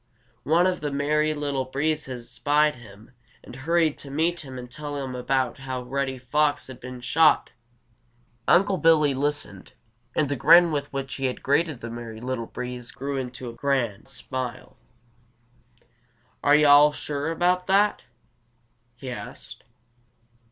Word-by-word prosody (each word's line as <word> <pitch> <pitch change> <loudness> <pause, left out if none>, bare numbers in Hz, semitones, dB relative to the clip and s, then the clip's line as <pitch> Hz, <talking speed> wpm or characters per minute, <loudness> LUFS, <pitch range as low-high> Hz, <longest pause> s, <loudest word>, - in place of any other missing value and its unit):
One 165 +4 +4
of 185 -1 +1
the 150 - -2
Merry 150 +2 +1
Little 140 -3 -2
Breezes 135 -3 -2
spied 150 -1 +2
him 110 -1 -15 0.3
and - - -11
hurried 160 +2 +1
to 140 - -9
meet 165 +5 0
him 130 -4 -9
and 125 -1 -9
tell 145 +2 -6
him 135 -2 -4
about 130 0 -1
how 130 -1 -5
Reddy 130 +1 -2
Fox 145 +3 0
had 130 -2 -10
been 125 0 -9
shot. 155 +5 +3 1.0
Unc' 190 -1 +3
Billy 150 -3 +5
listened, 140 -8 -3 0.4
and 150 - +2
the 145 - -1
grin 165 +6 +6
with 145 -1 -3
which 135 -1 -4
he 135 - -3
had 125 - -3
greeted 145 -1 +1
the 115 - -6
Merry 115 -1 -7
Little 125 -1 -4
Breeze 125 -1 -7
grew 140 +1 -4
into 125 -1 -5
a 120 - -6
broad 120 -6 -1
smile. 130 -2 -6 1.7
"Are 145 0 +6
yo' 150 0 +5
all 145 +1 +7
sure 145 +1 -3
about 180 +2 +1
that?" 200 +2 +3 0.9
he 130 +1 -7
asked. 120 - -9
140 Hz, 150 wpm, -25 LUFS, 125-150 Hz, 1.7 s, all